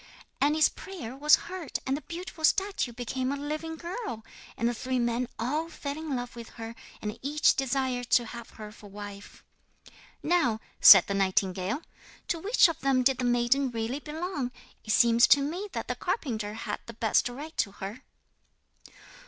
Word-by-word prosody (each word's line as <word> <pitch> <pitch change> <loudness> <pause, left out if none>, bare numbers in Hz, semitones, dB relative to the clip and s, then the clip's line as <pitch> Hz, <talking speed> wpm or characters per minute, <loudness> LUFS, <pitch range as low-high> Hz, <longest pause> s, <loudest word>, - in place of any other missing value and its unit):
'And 290 +2 +3
his 310 -1 +5
prayer 270 -11 -8
was 295 +2 +6
heard, 345 -6 -4
and 265 - 0
the 295 - -5
beautiful 335 +1 -8
statue 385 -5 +2
became 255 +2 -3
a - - -1
living 305 +3 -4
girl, 345 - -6 0.3
and 230 - +1
the 240 - +1
three 255 +2 -2
men 240 0 0
all 300 +8 -1
fell 285 -3 -5
in 310 -3 -4
love 245 -1 -5
with 235 -1 -9
her, 225 0 -6 0.3
and 210 +1 -4
each 295 +3 +3
desired 260 -2 -1
to 240 - +4
have 235 0 -9
her 215 -1 -10
to 215 -1 -14
wife. 205 0 -10 0.8
'Now,' 285 -10 +2 0.2
said 195 -3 +10
the 200 - -3
nightingale, 190 - 0 0.5
'to 335 - 0
which 410 +3 +5
of 330 - -4
them 265 -2 +2
did 260 0 +3
the - - -1
maiden 245 +3 +2
really 230 +3 -3
belong? 300 -3 -4 0.3
It - - -13
seems 235 +2 +5
to 285 - +7
me 350 +8 -3
that - - -4
the - - -1
carpenter 220 - -3
had 225 - -4
the 230 - -8
best 225 +2 +2
right 295 +6 -8
to 200 - 0
her.' 200 +6 -7
255 Hz, 175 wpm, -28 LUFS, 230-305 Hz, 0.8 s, said